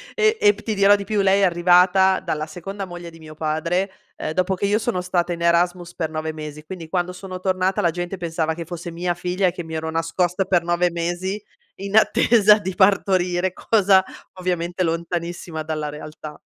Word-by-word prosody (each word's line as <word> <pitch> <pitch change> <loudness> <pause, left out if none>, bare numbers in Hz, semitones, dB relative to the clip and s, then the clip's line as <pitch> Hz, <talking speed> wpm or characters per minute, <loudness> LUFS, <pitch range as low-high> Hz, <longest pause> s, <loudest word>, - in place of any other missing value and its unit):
e 435 0 +3
ept 205 0 +3
ti 220 - -2
dirò 200 0 +5
di 200 - -4
più 210 -1 0
lei 195 +1 +3
è - - +3
arrivata 180 +2 +4
dalla 155 0 -3
seconda 195 +5 -6
moglie 175 -2 -9
di 165 - -15
mio 155 -1 -12
padre, 165 +5 -1 0.3
uhm, 155 - -3
dopo 185 +3 0
che 200 - -2
io 205 +2 +2
sono 225 -5 -1
stata 180 -1 -1
in 170 - -7
Erasmus 175 0 +1
per 160 -2 -2
9 155 0 -3
mesi, 150 -1 -8
quindi 165 -2 -8
quando 180 0 -1
sono 185 0 -8
tornata 185 0 0
la 170 - +2
gente 175 +3 -4
pensava 165 -2 -2
che 170 -1 -6
fosse 175 0 -7
mia 175 +1 -2
figlia 180 +2 -1
e 180 - +1
che 175 0 -7
mi 160 0 -7
ero 160 0 -3
nascosta 175 +3 0
per 180 -3 +2
9 175 +1 +1
mesi 175 +4 -3 0.4
in 200 +2 -5
attesa 215 -1 +5
di 190 -2 -5
partorire, 185 -2 +2
cosa 195 -3 +3 0.3
ovviamente 180 -1 -2
lontanissima 170 -1 -3
dalla 155 -1 -3
realtà. 150 0 -9
180 Hz, 195 wpm, -22 LUFS, 165-190 Hz, 0.4 s, dirò